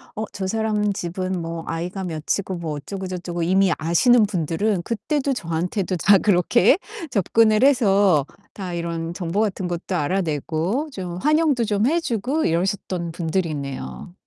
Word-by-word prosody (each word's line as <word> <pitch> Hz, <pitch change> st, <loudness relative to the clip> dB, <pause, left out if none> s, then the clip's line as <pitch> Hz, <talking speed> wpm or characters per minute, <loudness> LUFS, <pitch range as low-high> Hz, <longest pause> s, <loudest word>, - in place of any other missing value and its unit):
'어 215 Hz, -, -3 dB
저 190 Hz, -1 st, -4 dB
사람 210 Hz, -1 st, 0 dB
집은 185 Hz, +1 st, -3 dB
뭐 165 Hz, 0 st, -5 dB
아이가 180 Hz, +4 st, -4 dB
몇이고 180 Hz, +4 st, -2 dB
뭐 160 Hz, -2 st, -3 dB
어쩌고저쩌고' 180 Hz, +1 st, -5 dB
이미 190 Hz, +1 st, +3 dB
아시는 215 Hz, +9 st, +4 dB
분들은 185 Hz, +1 st, -1 dB
그때도 275 Hz, -, -1 dB
저한테도 180 Hz, -1 st, -2 dB
다 200 Hz, +4 st, +6 dB
그렇게 205 Hz, -, +4 dB, 0.3 s
접근을 215 Hz, +2 st, +3 dB
해서 200 Hz, -, +4 dB, 0.3 s
다 185 Hz, -3 st, -6 dB
이런 170 Hz, 0 st, -3 dB
정보 180 Hz, +3 st, -1 dB
같은 195 Hz, -4 st, -1 dB
것도 175 Hz, +2 st, -3 dB
알아내고 170 Hz, -, -1 dB
좀 180 Hz, -4 st, -5 dB
환영도 300 Hz, -, +2 dB
좀 210 Hz, +1 st, +1 dB
해 335 Hz, +3 st, +2 dB
주고 265 Hz, +2 st, -1 dB
이러셨던 175 Hz, 0 st, -1 dB
분들이네요. 160 Hz, -1 st, -4 dB
185 Hz, 310 characters per minute, -22 LUFS, 170-215 Hz, 0.3 s, 다